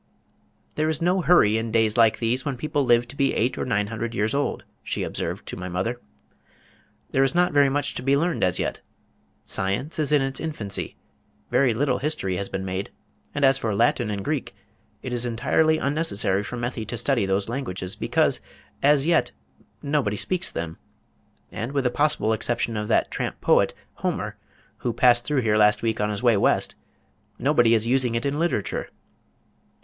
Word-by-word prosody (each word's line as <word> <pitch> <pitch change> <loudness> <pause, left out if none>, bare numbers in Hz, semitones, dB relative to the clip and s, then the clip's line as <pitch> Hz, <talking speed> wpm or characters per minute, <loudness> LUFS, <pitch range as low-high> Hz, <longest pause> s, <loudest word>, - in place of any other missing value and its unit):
"There 155 +1 0
is 155 -1 -1
no 180 +2 +2
hurry 110 -12 +4
in 115 0 -4
days 110 -1 +2
like 115 -2 +4
these 120 +3 0
when 140 -4 -3
people 145 +1 -1
live 120 -1 +3
to 140 - -9
be 140 -1 +1
eight 120 +3 +1
or - - -3
nine 105 -4 +1
hundred 115 +2 -4
years 110 +2 0
old," 145 +1 -1 0.2
she - - -3
observed - - -4
to - - -5
my 90 0 -6
mother. 105 +8 -2 1.1
"There 135 - +3
is 135 +5 0
not 180 0 +3
very 145 -1 +5
much 145 +1 -1
to - - -5
be 135 +2 +2
learned 170 +3 0
as 90 -1 +2
yet. - - -2 0.7
Science 100 +13 -2
is 150 -1 +1
in 145 -2 +4
its 135 0 -2
infancy, 115 -12 -4 0.6
very 130 -4 +3
little 125 0 +1
history 130 -11 -1
has 100 - -3
been 95 0 -4
made, 95 +1 -3 0.5
and 145 -1 +3
as 135 0 +4
for 110 -3 -1
Latin 120 +1 +2
and 100 -2 -4
Greek, - - -3 0.5
it 130 - -4
is 120 -1 0
entirely 155 +7 +2
unnecessary 140 -11 0
for 125 - -6
Methy 120 -1 -3
to 120 - -4
study 120 -3 +1
those 95 +1 0
languages, 105 -7 -4
because - - +1 0.4
as 145 0 +4
yet, 170 - +2 0.5
nobody 140 -8 0
speaks 185 - 0
them, 80 -1 -5 0.7
and 120 +5 -5
with 140 -2 +1
the 125 - +1
possible 145 -7 +1
exception 115 +1 -1
of 105 0 -3
that 115 - +2
tramp - - -3
poet, - - +3 0.2
Homer, - - -3 0.4
who 120 - -2
passed 120 0 +4
through 145 -1 +1
here 110 -2 +2
last 105 +1 +4
week 110 -2 0
on 105 - +1
his 105 +3 -4
way 120 -3 +5
West, - - +2 0.6
nobody 120 -4 +3
is 110 0 +1
using 125 -1 +1
it 115 - -1
in 140 +2 -1
literature. 165 - -1
120 Hz, 185 wpm, -24 LUFS, 105-140 Hz, 1.1 s, very